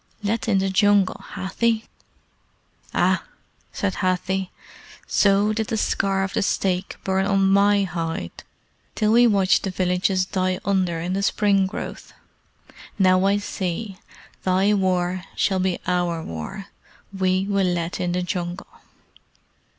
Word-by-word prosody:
Let 220 +3 -1
in 205 -4 +3
the 195 0 0
Jungle, 205 0 +3
Hathi!" 220 +4 0 1.1
"Ah!" - - +2 0.5
said 200 -2 -2
Hathi. 185 0 -1 0.6
"So 200 +1 +3
did 220 0 -2
the 225 - -2
scar 195 -2 0
of 195 - -4
the - - +1
stake 185 -2 -1
burn 190 0 0
on 195 -1 +3
my 200 +1 +4
hide 165 - -4 0.5
till 215 0 +2
we 240 +2 +6
watched 195 -4 +3
the 195 - -3
villages 185 0 +1
die 185 -1 -1
under 185 -4 +1
in 175 +3 -3
the 195 - -1
spring 200 -1 +2
growth. 190 - -7 0.8
Now 185 -1 +4
I 200 +1 +3
see. 195 0 -4 0.4
Thy 190 +3 +2
war 185 -2 0
shall 190 -2 +1
be 185 -1 0
our 175 -2 0
war. 85 - -7 0.5
We 185 0 +1
will 200 -2 +1
let 175 0 -2
in 180 -1 -1
the 180 0 -1
jungle!" 180 0 -4
190 Hz, 135 wpm, -23 LUFS, 180-200 Hz, 1.1 s, we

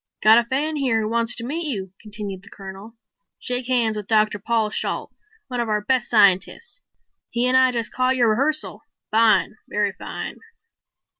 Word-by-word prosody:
"Got 220 +2 +7
a - - 0
fan 290 +6 -2
here 250 -6 +1
who 215 - -2
wants 230 0 +4
to 230 - -4
meet 315 +5 -1
you," 195 -9 -3
continued 205 -3 -6
the 200 - -16
Colonel. 195 +3 -10 0.4
"Shake 250 0 -3
hands 235 -4 +1
with 210 -2 -6
Dr. 215 -2 +2
Paul 220 0 0
Shalt, - - -3 0.3
one 250 -3 -4
of 235 -2 -1
our 210 0 0
base 255 +4 0
scientists. 210 - +2 0.5
He 240 +1 +1
and 255 - +2
I 260 0 +5
just 235 -2 -2
caught 255 +1 +1
your 240 -3 +3
rehearsal. 295 +7 0 0.3
Fine, 220 -1 +3
very 205 -1 0
fine." - - -7
230 Hz, 175 wpm, -22 LUFS, 210-255 Hz, 0.5 s, Got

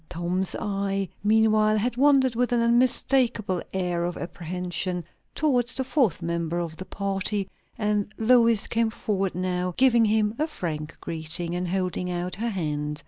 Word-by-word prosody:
Tom's 180 +2 -2
eye 195 -2 -2 0.2
meanwhile 215 0 +4
had 235 +3 -1
wandered, 270 -1 +4
with 245 +1 0
an 240 - +2
unmistakeable 235 -4 +2
air 180 -2 -1
of 175 0 -3
apprehension, 180 +1 -3 0.3
towards 250 -5 +1
the 265 - 0
fourth 255 - +1
member 170 0 -2
of 170 -2 -3
the 185 - -7
party; 195 0 -2 0.3
and 210 -2 0
Lois 230 -2 +4
came 230 -1 +1
forward 195 -4 -2
now, 180 0 -2
giving 240 -3 +5
him 215 0 +2
a 310 - +1
frank 155 - -5
greeting, 165 +1 -2
and 180 0 -2
holding 180 0 -2
out 180 0 -3
her 230 +4 -1
hand. 150 -6 -3
195 Hz, 150 wpm, -25 LUFS, 175-230 Hz, 0.3 s, giving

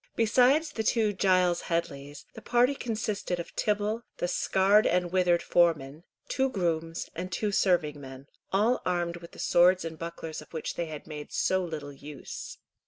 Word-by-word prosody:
Besides 255 +7 +3
the 225 - -3
two 220 -2 +2
Giles 185 -2 +2
Headleys, 145 -4 -3
the - - -10
party 245 +3 +3
consisted 215 -7 -3
of 170 - -8
Tibble, 210 +2 0 0.2
the 175 - -1
scarred 195 +3 +3
and 175 0 +1
withered 180 -2 +2
foreman, 160 -2 +1 0.2
two 265 0 +1
grooms, 165 -6 -2
and 180 +3 -5
two 205 +3 -1
serving 165 -7 +1
men, 135 0 -10 0.3
all 215 +6 +2
armed 175 -1 -1
with 170 -1 -13
the - - -13
swords 180 +1 +4
and 160 -1 -6
bucklers 165 -1 -6
of - - -16
which 160 - -3
they 170 - -3
had 155 -2 -8
made 150 -2 -8
so 185 0 +1
little 150 -4 -6
use. 145 0 -9
175 Hz, 170 wpm, -28 LUFS, 160-205 Hz, 0.3 s, swords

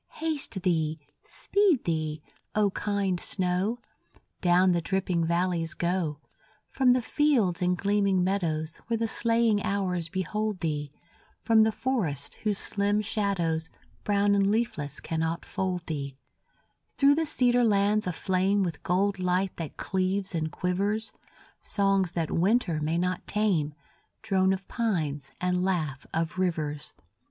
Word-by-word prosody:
Haste 295 - -2
thee, 160 -4 0 0.2
speed 395 - +1
thee, 155 -2 -2 0.3
O 210 -2 +3
kind 200 -3 -1
snow; 185 +6 0 0.6
Down 180 +1 +4
the 170 -1 +1
dripping 180 -2 0
valleys 170 -1 0
go, 170 -4 -1 0.5
From 260 -2 +3
the 250 -1 0
fields 235 - +2
and 180 0 +2
gleaming 200 -2 +2
meadows, 165 -4 -1
Where 230 0 0
the 225 0 0
slaying 230 -2 +2
hours 180 -4 -1
behold 200 +2 -2
thee, 150 -3 -2 0.5
From 225 -1 +4
the 220 0 +4
forests 180 - -2
whose 210 -2 0
slim 205 +2 +1
shadows, 180 -7 -1 0.3
Brown 205 0 +2
and 200 -1 +3
leafless 200 - -1
cannot 160 +1 -2
fold 180 -2 -3
thee, 140 -4 -4 0.8
Through 280 0 +6
the 320 +1 0
cedar 245 -4 +3
lands 205 -1 +2
aflame 190 +3 +1
With 170 -5 -4
gold 195 +2 +1
light 185 +1 0
that 165 -3 -6
cleaves 190 +1 -1
and 160 -2 -2
quivers, 205 +4 -1 0.5
Songs 195 -3 +1
that 165 -2 -2
winter 180 -3 +2
may 160 +2 0
not 180 +1 -2
tame, 180 -9 0 0.5
Drone 190 -3 +2
of 190 0 -3
pines 155 - -2
and 180 0 0
laugh 155 -8 -1
of 165 +2 -2
rivers. 155 -5 -2
185 Hz, 135 wpm, -27 LUFS, 165-205 Hz, 0.8 s, Through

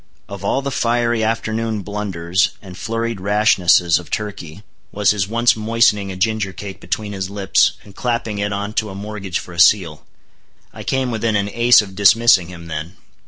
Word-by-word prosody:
Of 100 -1 -9
all 135 +7 0
the 140 - -3
fiery 120 -2 0
afternoon 110 -1 -2
blunders 95 -2 -1
and 95 -3 -12
flurried 115 +1 -3
rashnesses 95 -4 +3
of 90 - -12
Turkey, 100 -4 -6 0.3
was 105 -1 +2
his 100 -3 -1
once 120 +3 +2
moistening 110 -2 +1
a - - -7
ginger 100 +1 -1
cake 100 -1 -8
between 105 -1 -4
his 95 -1 -4
lips, 100 -1 +2
and 100 -2 -16
clapping 115 -4 -2
it 105 0 -1
on 100 +1 -4
to 110 - -8
a 95 - -8
mortgage 100 -2 -5
for 90 - -8
a 85 - -7
seal. 85 -5 +3 0.7
I - - -9
came 130 -2 -1
within 110 -1 -1
an 100 0 -1
ace 120 -1 +5
of 95 -2 -11
dismissing 105 -1 +4
him 85 -2 -11
then. 80 +3 -6
105 Hz, 180 wpm, -19 LUFS, 95-110 Hz, 0.7 s, ace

